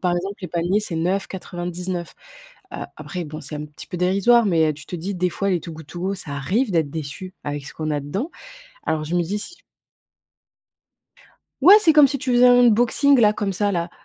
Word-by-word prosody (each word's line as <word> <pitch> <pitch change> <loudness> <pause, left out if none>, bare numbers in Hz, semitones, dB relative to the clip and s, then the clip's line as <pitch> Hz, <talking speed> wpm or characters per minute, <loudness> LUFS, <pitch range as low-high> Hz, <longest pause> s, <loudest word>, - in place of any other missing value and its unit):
par 175 -1 +1
exemple, 195 +3 -4
les 180 - -6
paniers, 175 +4 0
c'est 175 -6 -4
9,99, 180 0 -3 0.6
heu, - - -5 0.2
après, 180 -2 -5
bon, 155 0 -8
c'est 150 - -7
un 150 - -5
petit 150 -1 -12
peu 180 - -6
dérisoire, 200 +6 +3
mais 160 -5 +2
tu 150 - -12
te 180 - -6
dis, 190 +4 -4
des 180 0 0
fois 200 +3 -2
les 175 -4 0
Too 170 - -8
Good 160 -2 -11
To 175 - -8
Go, 195 +2 -1
ça 165 -6 -7
arrive 205 - 0
d'être 160 -5 +1
déçu, 160 +5 -7
avec 145 -1 -4
ce - - -10
qu'on 155 -1 -3
a 145 - 0
dedans. 195 - -4 0.5
Alors 155 -1 -1
je 160 +3 -5
me 175 - +3
dis 195 +5 -2
si 350 +12 -8 2.0
Ouais, 370 +8 +9
c'est 325 -5 +5
comme 300 -2 +7
si 275 0 -3
tu 260 -1 -3
faisais 245 +1 +5
un 245 0 +7
unboxing 245 +4 +4
là 210 -2 +5
comme 205 -2 -2
ça, 205 +2 0
là. 170 0 -2
180 Hz, 220 wpm, -22 LUFS, 165-210 Hz, 2.0 s, Ouais